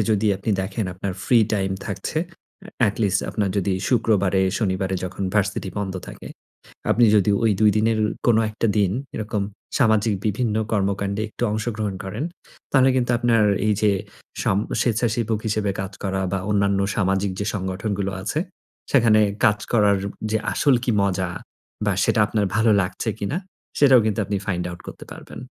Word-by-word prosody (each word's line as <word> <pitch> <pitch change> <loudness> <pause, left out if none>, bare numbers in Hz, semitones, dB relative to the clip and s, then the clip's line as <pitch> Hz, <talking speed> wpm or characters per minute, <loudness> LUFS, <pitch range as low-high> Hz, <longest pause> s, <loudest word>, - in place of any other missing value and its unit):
যদি 110 0 +2
আপনি 100 +3 -3
দেখেন 95 +3 -3
আপনার 95 +1 -4
free 115 -3 +5
time 95 -2 0
থাকছে। 100 - -3
এ - - -21 0.6
atleast 100 -2 0
আপনার 100 -2 0
যদি 100 0 +1 0.2
শুক্রবারে, 100 -6 +2 0.2
শনিবারে 95 -3 -1
যখন 95 +2 -5
ভার্সিটি 100 -2 0
বন্ধ 95 -2 -3
থাকে, - - -9 0.6
আপনি 120 - +5
যদি 105 0 +3
ওই 115 - +4
২ 105 - +6
দিনের 110 +1 +2 0.3
কোন 120 -2 +5
১ 110 - -9
টা 115 - +4
দিন 100 -3 +2 0.2
এরকম 105 -1 -2 0.4
সামাজিক 110 -4 +3
বিভিন্ন 110 +1 0 0.2
কর্মকাণ্ডে 100 0 0
একটু 110 - -9
অংশগ্রহণ 110 -2 -2
করেন। 105 +9 -4 0.5
তাহলে 135 -1 +5
কিন্তু 125 -1 +1
আপনার 115 -2 +3 0.2
এই 105 - +3
যে, 105 - +5 0.5
সাম 95 - +2 0.2
স্বেচ্ছাসেবক 115 -1 0
হিসেবে 105 -2 0
কাজ 95 +1 -5
করা 95 -1 -1
বা 95 - +1
অন্যান্য 100 -1 +2 0.2
সামাজিক 95 -1 +1 0.2
সংগঠনগুলো 95 +1 -2
আছে, 110 - -2 0.5
সেখানে 115 -5 +5 0.2
কাজ 105 0 +4
করার 105 -3 +4 0.3
যে, 110 - +2
আসল 140 -3 +3
কি 125 - +1
মজা 95 -2 0 0.6
বা - - +3
সেটা - - +2
আপনার 105 -2 0
ভালো 110 +1 +3
লাগছে 90 +4 -3
কিনা 130 - -1 0.4
সেটাও 135 -4 +7
কিন্তু 110 -1 -1
আপনি 100 +1 -2
find 90 -4 -1
out 85 -1 -9
করতে - - -9
পারবেন। - - -11
105 Hz, 160 wpm, -23 LUFS, 95-110 Hz, 0.6 s, সেটাও